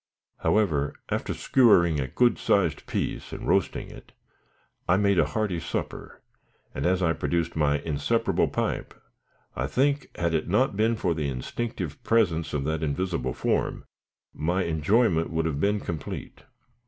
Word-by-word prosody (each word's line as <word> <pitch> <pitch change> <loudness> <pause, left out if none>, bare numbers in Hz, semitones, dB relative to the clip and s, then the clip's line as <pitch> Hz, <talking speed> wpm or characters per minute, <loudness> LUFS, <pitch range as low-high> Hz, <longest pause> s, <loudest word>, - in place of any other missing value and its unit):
However, 80 -10 +1
after - - -2
skewering 85 - +4
a 65 - -1
good 120 - +2
sized - - +1
piece - - -3
and - - -6
roasting - - 0
it, - - -14 0.8
I 90 - +5
made 100 -2 +3
a - - +3
hearty 105 -6 -1
supper; 80 - -5 0.5
and, - - -1
as 95 0 +2
I 80 -1 +3
produced 80 +2 -1
my 75 -2 +2
inseparable 75 -1 0
pipe, - - -2 0.6
I 65 +2 -1
think, 140 - +1
had 85 -1 0
it 80 -1 0
not 105 +4 +2
been 110 +3 +2
for 90 -5 0
the 75 -3 -2
instinctive 85 - -4
presence 90 -8 +2
of 70 -2 -1
that 80 +2 -1
invisible 80 -4 -2
form, - - -1 0.5
my 85 +5 0
enjoyment 85 +2 +2
would 80 0 -1
have 75 -3 -1
been 105 +5 +2
complete. 80 -6 -6
85 Hz, 150 wpm, -26 LUFS, 75-105 Hz, 0.8 s, I